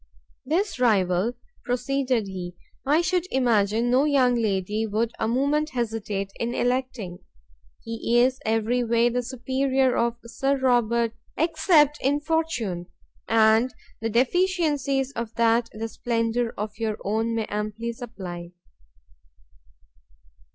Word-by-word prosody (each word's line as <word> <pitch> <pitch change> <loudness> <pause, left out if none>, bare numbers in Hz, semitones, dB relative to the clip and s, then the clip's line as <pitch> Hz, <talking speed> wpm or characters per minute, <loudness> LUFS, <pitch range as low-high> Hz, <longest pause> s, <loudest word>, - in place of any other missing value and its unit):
"This 355 +1 0
rival," 200 -2 +2 0.3
proceeded 250 -1 0
he, 180 -2 -6 0.3
"I 300 +4 +4
should 360 0 0
imagine 230 -2 +2
no 260 +3 +4
young 265 -4 +3
lady 215 -1 0
would 220 +2 0
a 220 - 0
moment 285 +6 +1
hesitate 215 -4 -2
in 235 +1 -2
electing; 245 -7 -2 0.6
he 230 +1 -1
is 255 +2 +3
every 225 +2 +1
way 235 +1 +3
the 245 +1 -1
superior 260 +1 0
of 235 0 0
Sir 270 +4 0
Robert 235 -3 +2 0.2
except 315 -2 +3
in 285 +2 +2
fortune, 295 - -2 0.4
and 225 +2 +4 0.3
the 225 - -1
deficiencies 280 - +1
of 235 -3 -5
that 230 0 +2
the 220 +1 -4
splendour 230 0 -1
of 210 +1 -5
your 220 -2 -1
own 225 +3 0
may 225 -1 -1
amply 215 +3 -3
supply." 180 -8 -8
235 Hz, 120 wpm, -25 LUFS, 220-265 Hz, 0.6 s, I